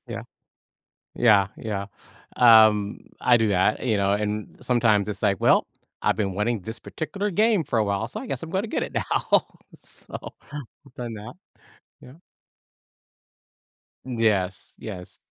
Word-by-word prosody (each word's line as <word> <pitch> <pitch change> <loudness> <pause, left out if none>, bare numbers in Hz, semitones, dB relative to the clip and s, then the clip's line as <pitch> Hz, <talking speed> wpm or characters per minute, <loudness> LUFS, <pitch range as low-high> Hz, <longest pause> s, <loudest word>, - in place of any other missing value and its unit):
Yeah. - - -5 0.9
Yeah, 105 -5 +5
yeah. 100 -3 -4 0.5
Um. 110 -4 +6 0.2
I 125 - +4
do 110 -1 +1
that, 100 +2 +2
you 110 -4 +2
know, 100 0 +2
and 105 0 -3
sometimes 115 -5 +2
it's 100 -2 -5
like, 100 -3 +1
"Well, - - +4 0.3
I've - - +2
been 100 -3 -1
wanting 105 +2 -1
this 110 +5 -7
particular 200 +6 -4
game 210 -1 +3
for 130 -4 -1
a - - +3
while 100 -1 -1
so 215 - -7
I 265 - -8
guess - - -4
I'm 165 - -7
gonna 195 +5 -1
get - - -2
it - - -7
now." - - +2 0.4
So, - - -13 0.6
I've 140 -3 -23
done 120 -2 -6
that. 105 0 -9 0.7
Yeah. 125 - -13 1.9
Yes, 110 -7 -1
yes. 90 -5 -8
110 Hz, 150 wpm, -24 LUFS, 100-125 Hz, 1.9 s, Um